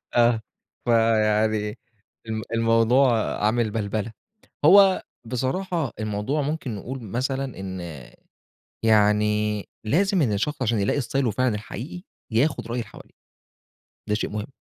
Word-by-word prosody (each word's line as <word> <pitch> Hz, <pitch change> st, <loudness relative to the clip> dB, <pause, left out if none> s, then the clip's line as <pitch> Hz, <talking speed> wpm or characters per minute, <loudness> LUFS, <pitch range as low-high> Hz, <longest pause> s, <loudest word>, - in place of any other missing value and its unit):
آه، 120 Hz, -2 st, +4 dB, 0.4 s
فيعني 110 Hz, -1 st, +2 dB, 0.5 s
ال 110 Hz, 0 st, -3 dB
الموضوع 115 Hz, +1 st, +3 dB
عامِل 110 Hz, 0 st, +1 dB
بَلبلة. 110 Hz, +1 st, -2 dB, 0.5 s
هو 195 Hz, +2 st, +7 dB, 0.2 s
بصراحة 135 Hz, -, -2 dB
الموضوع 110 Hz, +8 st, -1 dB
ممكن 140 Hz, -6 st, -3 dB
نقول 125 Hz, +6 st, -6 dB
مثلًا 130 Hz, +6 st, -2 dB
إن 95 Hz, -2 st, -5 dB, 1.0 s
يعني 105 Hz, -1 st, +3 dB, 0.2 s
لازم 185 Hz, -, +2 dB
إن 110 Hz, -7 st, +2 dB
الشخص 135 Hz, +8 st, -2 dB
عشان 115 Hz, -3 st, +1 dB
يلاقي 100 Hz, +8 st, +1 dB
إستايله 130 Hz, -1 st, 0 dB
فعلًا 125 Hz, 0 st, +1 dB
الحقيقي 125 Hz, -, -7 dB, 0.3 s
ياخد 120 Hz, 0 st, +1 dB
رأي 120 Hz, +1 st, -2 dB
اللي 115 Hz, -, -6 dB
حواليه، -, -, -14 dB, 1.0 s
ده 105 Hz, -, +2 dB
شيء 110 Hz, -, -2 dB
مهم. 105 Hz, +5 st, -5 dB
115 Hz, 120 wpm, -24 LUFS, 105-135 Hz, 1.0 s, هو